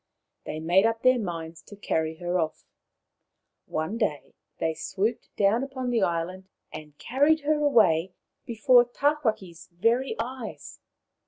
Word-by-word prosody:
They 155 - -4
made 175 +6 +3
up 230 0 -3
their 255 -1 +5
minds 165 -5 -5
to 205 - -13
carry 160 -5 -2
her 175 +2 -2
off. 160 -2 -3 1.0
One 160 +9 -3
day 155 - -2 0.2
they 160 - -1
swooped 205 +8 -3
down 205 +4 +3
upon 260 -2 -4
the 235 -3 +1
island 185 +2 -2 0.2
and 150 -1 -10
carried 290 +6 +2
her 300 +1 +1
away 190 - +3 0.3
before 240 +2 +4
Tawhaki's 240 - -1
very 230 +9 +1
eyes. 245 0 -6
205 Hz, 135 wpm, -26 LUFS, 165-245 Hz, 1.0 s, their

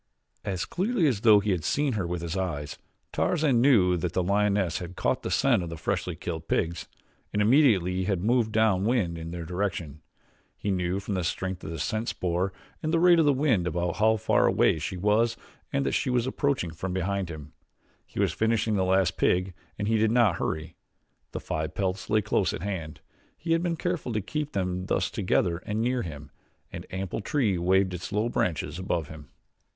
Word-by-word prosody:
As 95 -3 -2
clearly 200 0 0
as 120 -9 +1
though 110 -3 +7
he 105 0 0
had 90 -4 -1
seen 140 - +1
her 95 -5 -2
with 85 -1 -3
his 85 +1 -3
eyes, 80 -6 -3 0.4
Tarzan 150 -8 +2
knew 100 -10 +4
that 85 +1 -3
the 90 - +1
lioness 100 -2 +1
had 90 +1 -7
caught - - 0
the - - -4
scent 125 -7 +3
of 85 - -5
the 85 - -6
freshly 90 +1 -2
killed 80 -1 -6
pigs 85 +1 -1 0.4
and 105 - -1
immediately 105 - +3
had 95 -2 -1
moved 115 0 +2
down 110 -4 +2
wind 105 -7 +1
in 80 0 -6
their 85 -1 -6
direction. 85 -5 -3 0.6
He 100 - -2
knew 90 0 0
from 100 +1 -4
the 90 -2 -1
strength 95 +2 -3
of - - -6
the 80 - -5
scent 110 +8 -2
spoor 90 +2 -1 0.3
and 155 - -1
the 165 - +3
rate 175 0 +6
of 160 - +4
the 145 - +5
wind 130 - +1
about 85 +1 -1
how 110 +1 +4
far - - +2
away 80 - +3
she 90 +4 -4
was 110 +5 +2 0.3
and 140 0 0
that - - +1
she - - 0
was 125 -1 +1
approaching 130 - -1
from 90 +3 -5
behind 95 0 -1
him. 75 -2 -9 0.5
He - - -9
was - - +2
finishing 110 -1 +1
the 95 - +2
last 95 -1 +2
pig 90 +1 +1 0.2
and 100 - -2
he 110 0 +2
did 110 0 +3
not 115 -6 +3
hurry. 80 +1 -3 0.5
The - - -4
five 80 +1 -4
pelts 95 0 -2
lay 110 0 +2
close 100 -2 +1
at 80 - -5
hand 85 -8 -5 0.4
he 165 - -4
had 165 0 +3
been 170 -2 -1
careful 175 -9 -2
to 110 - 0
keep 150 +8 -4
them 90 -1 -2
thus - - 0
together 85 -2 +1
and 105 +3 -4
near 125 +2 +1
him 75 -5 -8 0.4
an - - -6
ample 95 +2 -4
tree 110 - 0
waved 95 +1 +2
its 90 +2 -6
low 105 +3 0
branches 85 -4 -1
above 85 -4 -2
him. 75 -3 -11
95 Hz, 205 wpm, -27 LUFS, 85-115 Hz, 0.6 s, though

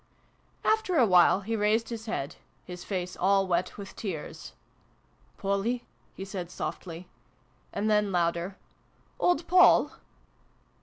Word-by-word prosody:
After 435 -5 +2
a 250 - +6
while 180 0 +5
he 225 +3 -2
raised 215 +2 +1
his 230 -1 -6
head 145 -9 -4 0.3
his 180 -1 -8
face 180 -2 -4
all 195 +1 +3
wet 180 0 -1
with 200 -1 -9
tears. 160 - -6 0.4
" - - -36
Polly! 200 +5 -1
" 115 0 -37
he 195 - -5
said 185 -3 -6
softly; 175 -1 -6 0.6
and 205 +2 -2
then, 210 -2 +2
louder, 170 +1 0 0.3
" - - -37
Old 350 -2 +2
Poll 365 +1 +6
195 Hz, 140 wpm, -28 LUFS, 180-220 Hz, 0.6 s, a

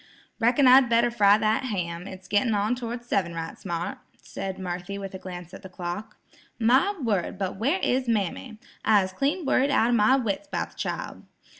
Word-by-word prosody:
"Reckon 245 +4 +4
I'd 255 -1 +7
better 235 +1 +3
fry 205 -3 +5
that 220 +4 +1
ham; 180 -5 -3
it's 190 -1 -10
gittin' 210 +2 +2
on 205 +3 +1
toward 240 -1 -5
seven 185 -8 -1
right 165 0 -5
smart," 175 -3 -4 0.2
said 190 -1 -6
Marthy 180 +1 -5
with 195 -1 -7
a 190 - -6
glance 180 -2 -9
at - - -10
the 190 - -10
clock. 185 +4 -6 0.4
"My 260 - +3
word, 205 - -1
but 190 -1 -3
where 275 - +1
is 255 0 +1
mammy! 220 +1 -2 0.3
I's 195 -3 +3
clean 290 - -1
worried 270 +1 +2
out 240 -4 +3
of - - +3
my 215 +4 +5
wits 255 +3 -2
'bout - - -3
the - - -23
child. - - -4
210 Hz, 190 wpm, -26 LUFS, 190-245 Hz, 0.4 s, I'd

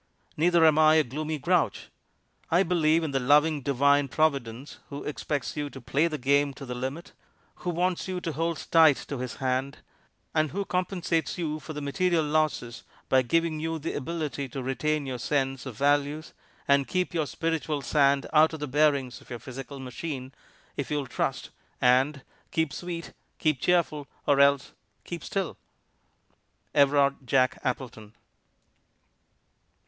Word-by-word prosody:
Neither 170 +1 +4
am 155 -1 +5
I 155 0 +6
a 160 - +5
gloomy 155 +5 -4
grouch. 170 +3 0 0.6
I 175 +3 +4
believe 165 -2 +2
in 145 -4 -3
a - - +3
loving 150 +3 +3
Divine 140 +2 +3
Providence 135 -3 -1
Who 140 0 -6
expects 145 -1 -3
you 145 -1 -3
to 135 - -10
play 140 +6 +1
the 155 -2 -3
Game 140 +1 +2
to 135 - -8
the 125 - -5
limit, 130 +7 -5 0.5
Who 180 - -4
wants 180 +2 0
you 185 -1 -3
to 165 - -3
hold 165 +2 -2
tight 160 -4 +7
to 140 - -4
His 125 -1 -4
hand, 130 +1 -1 0.6
and 155 -1 +2
Who 200 +4 -3
compensates 180 -3 -1
you 155 -3 -2
for 155 - -8
the 150 -1 -5
material 165 +3 +1
losses 150 -6 -1 0.3
by 130 - +5
giving 165 +4 0
you 165 +1 -2
the 160 +1 -4
ability 150 -2 -3
to 130 +1 -5
retain 150 +3 -1
your 130 -2 -4
sense 135 +1 -1
of 120 -5 -8
values, 145 +2 +1 0.3
and 140 -1 +3
keep 180 -1 -1
your 160 -3 0
spiritual 160 -3 -2
sand 140 -2 +3
out 155 +1 +5
of 160 - -5
the 150 - -2
bearings 140 -3 +1
of - - -19
your 120 - -5
physical 135 +4 -8
machine, 130 0 -6 0.4
if 140 - -4
you'll 145 -2 -1
trust - - -3 0.3
and 130 +3 +3 0.3
'Keep 160 -4 0
Sweet, 175 -2 -6 0.2
Keep 155 -5 0
Cheerful, 160 -5 +1 0.2
or 140 -1 +3
else 140 -1 +4 0.3
Keep 170 -1 -7
Still'" 195 -5 -3 1.2
Everard 140 -1 +4
Jack 130 0 +2
Appleton. 115 -4 -4
145 Hz, 160 wpm, -27 LUFS, 135-160 Hz, 1.2 s, tight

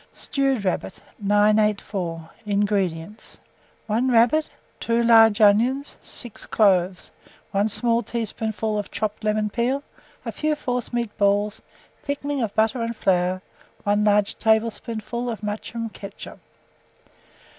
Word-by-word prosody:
STEWED 270 -6 -1
RABBIT. 185 - -2 0.2
984. 205 -5 +1 0.2
INGREDIENTS. 200 -2 -1 0.5
1 230 +4 +1
rabbit, 245 +6 +3 0.3
2 235 0 +1
large 225 -2 +6
onions, 235 +7 +3
6 240 -4 -3
cloves, 185 -3 +2 0.4
1 200 +2 +1
small 235 +2 +2
teaspoonful 220 -1 -3
of 205 - -5
chopped 215 0 -3
lemon 215 0 +1
peel, 255 +5 0 0.4
a - - -3
few 305 0 -1
forcemeat 240 -4 -3
balls, 205 +1 +1 0.4
thickening 285 -1 -3
of 220 -3 -2
butter 220 +2 +2
and 230 0 -2
flour, 185 -1 +1 0.4
1 205 +1 +2
large 205 -1 +2
tablespoonful 225 +2 0
of 220 -2 -5
mushroom 220 +2 -4
ketchup. 200 -2 -10
215 Hz, 115 wpm, -23 LUFS, 205-235 Hz, 0.5 s, large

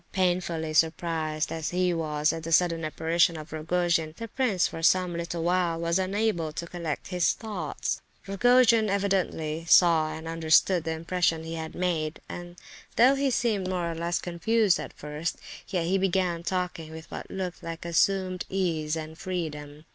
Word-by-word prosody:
Painfully 175 -4 0
surprised 160 -1 0
as 160 -1 -3
he 180 0 +1
was 155 -2 0
at 165 - -5
this 165 0 +3
sudden 165 -2 +1
apparition 165 +2 +1
of 155 0 -9
Rogojin, 165 0 0
the 230 - -5
prince, 220 -6 +1
for 165 - -7
some 180 +1 +3
little 170 0 -3
while, 175 -1 +1
was 170 +2 +1
unable 190 -4 0
to 170 - -4
collect 170 -3 -5
his 180 -2 +2
thoughts. 195 -10 -4 0.2
Rogojin, 230 +2 +4
evidently, 185 -5 0
saw 165 -3 +5
and 160 +1 -7
understood 165 +1 +3
the 160 - -1
impression 165 0 0
he 165 0 -6
had 160 -1 -5
made; 165 -4 -1
and 175 0 -8 0.4
though 250 +3 +6
he 275 0 +1
seemed 220 -6 0
more 175 -2 -1
or - - -3
less 170 +1 -1
confused 190 +3 +1
at - - -6
first, 150 +3 -4 0.3
yet 180 -4 -1
he 190 +3 +1
began 185 -2 +1
talking 180 -3 -3
with 160 0 -9
what - - -7
looked 185 -2 -5
like 165 0 -6
assumed 185 +2 +1
ease 165 -5 -1
and 160 0 -7
freedom. 155 -5 -5
170 Hz, 165 wpm, -27 LUFS, 160-185 Hz, 0.4 s, though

